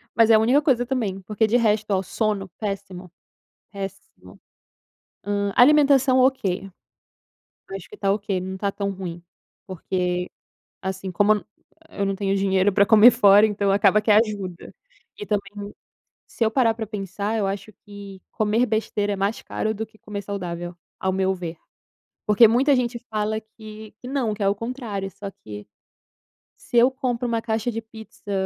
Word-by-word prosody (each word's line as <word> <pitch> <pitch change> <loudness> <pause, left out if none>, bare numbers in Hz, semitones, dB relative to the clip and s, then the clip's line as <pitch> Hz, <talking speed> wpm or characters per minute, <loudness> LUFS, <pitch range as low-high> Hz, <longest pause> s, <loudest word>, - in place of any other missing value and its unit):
Mas 230 0 +5
é 225 - +7
a 215 - +5
única 250 +6 +3
coisa 255 -5 +2
também, 220 -7 -2
porque 215 +3 0
de 235 +3 +3
resto, 215 -2 +1
oh, 190 0 +1
sono, 210 -1 -2
péssimo, 195 -4 -6 0.6
péssimo. 195 -1 -9 0.8
Hã, 200 -1 -1
alimentação, 275 -1 +5
ok. 200 -8 +1 1.0
Acho 195 -2 -7
que - - -13
está 195 -1 0
ok, 200 -2 -2
não 190 +1 -5
está 200 +1 -2
tão 200 0 -3
ruim, 180 -3 -7 0.4
porque, 180 -1 -2 0.5
assim, 190 0 -4
como 205 +4 +3
eu - - +3
não 210 - -7 0.4
eu 200 - -3
não 195 - -1
tenho 195 0 -1
dinheiro 195 0 +2
para 200 +1 +4
comer 220 +3 +8
fora, 205 -3 +6
então 200 -2 0
acaba 205 +1 +4
que 215 - 0
ajuda. 205 -5 +1 0.5
E 415 - -5
também, 205 0 -4 0.6
se 230 - -1
eu 220 - +1
parar 235 -2 +3
para 225 -1 -4
pensar 205 +1 -4
eu 205 -3 0
acho 200 +2 -5
que 200 -2 -11
comer 220 +2 +1
besteira 210 -2 -1
é - - -2
mais 200 +3 -2
caro 220 - -3
do 220 +1 -4
que 220 0 -24
comer 205 -1 -7
saudável, 175 -3 -5 0.2
ao 190 - 0
meu 190 0 +1
ver. 175 -3 -6 0.7
Porque 210 +2 +6
muita 260 +6 +3
gente 245 -1 -1
fala 215 0 -1
que 215 -1 -12
que 250 - -9
não, 255 -5 -1
que 210 - -9
é 195 - +3
o 200 - 0
contrário 230 -4 -5
só 200 +1 -8
que 105 - -11 1.0
se 240 - +1
eu 240 +2 +6
compro 250 -2 -3
um 230 -1 -1
caixa 225 0 -2
de 225 0 -4
pizza 220 -2 -12
205 Hz, 175 wpm, -23 LUFS, 195-225 Hz, 1.0 s, comer